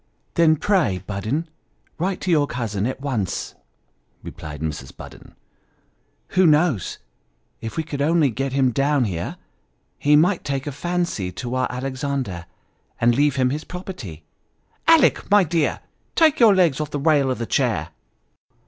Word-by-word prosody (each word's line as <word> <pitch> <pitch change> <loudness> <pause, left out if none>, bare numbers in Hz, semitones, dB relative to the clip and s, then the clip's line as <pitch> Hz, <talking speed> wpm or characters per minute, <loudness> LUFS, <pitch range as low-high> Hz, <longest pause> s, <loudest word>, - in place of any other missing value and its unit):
" - - -44
Then, 165 -2 +4
pray 155 - +1
Budden 110 - -2 0.5
write 185 +3 -1
to 185 - -1
your 150 -3 +3
cousin 110 -5 -2
at 130 +1 -5
once," 120 -10 -2 0.7
replied 75 -1 -8
Mrs. 75 -4 -5
Budden. - - -12 0.5
" - - -44
Who 185 -1 +4
knows, 150 - +2 0.6
if 115 +5 -6
we 160 - 0
could 145 -3 -5
only 155 -2 +3
get 135 +4 -2
him 130 -1 +2
down 140 +2 +2
here, 90 -6 -3
but - - -36
he 150 +1 +5
might 175 +5 +3
take 135 -1 -3
a 145 - -3
fancy 170 - -2
to 125 -1 -5
our 130 -1 +1
Alexander, 130 -8 -3 0.5
and 120 0 +4
leave 145 +2 +2
him 130 -1 +2
his 150 +3 -3
property? 130 - -8 0.6
Alick, 325 -4 +4
my 205 -1 +6
dear, 165 -2 0 0.3
take 315 -3 +4
your 225 -5 +7
legs 165 -6 +3
off 150 - -3
the 145 - -3
rail 145 -2 +3
of 130 - -1
the 115 - -3
chair - - 0
140 Hz, 160 wpm, -22 LUFS, 120-165 Hz, 0.7 s, your